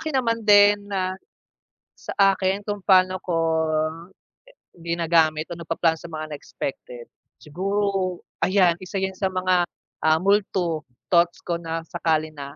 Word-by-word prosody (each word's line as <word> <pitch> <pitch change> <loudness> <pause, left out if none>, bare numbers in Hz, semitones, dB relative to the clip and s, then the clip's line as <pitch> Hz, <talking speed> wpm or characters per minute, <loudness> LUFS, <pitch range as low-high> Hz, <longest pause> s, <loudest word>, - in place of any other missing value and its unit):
akin 315 -4 -2
naman 230 -3 0
din 205 0 +7
na 185 -2 -1 0.8
sa - - -7 0.2
akin 190 +1 -1
kung 205 -1 -4
pa'no 185 -1 +4
ko 175 -2 -1 1.5
ginagamit 165 -2 +1
o 170 - -6
nagplaplano 165 0 0
sa 170 - -10
mga 155 -1 -6
unexpected, 125 -4 -7 0.3
siguro 190 +2 -2 0.2
ayan, 185 -3 +4
isa 185 +2 -5
yun 190 0 -1
sa 190 0 -1
mga, 185 -1 +1 0.4
ah, 160 0 +4
multo 190 -5 +1 0.3
thoughts 170 -1 +3
ko 170 -1 -1
na 165 0 -4
sakali 155 -2 -1
na 140 -1 -9
180 Hz, 135 wpm, -23 LUFS, 165-195 Hz, 1.5 s, din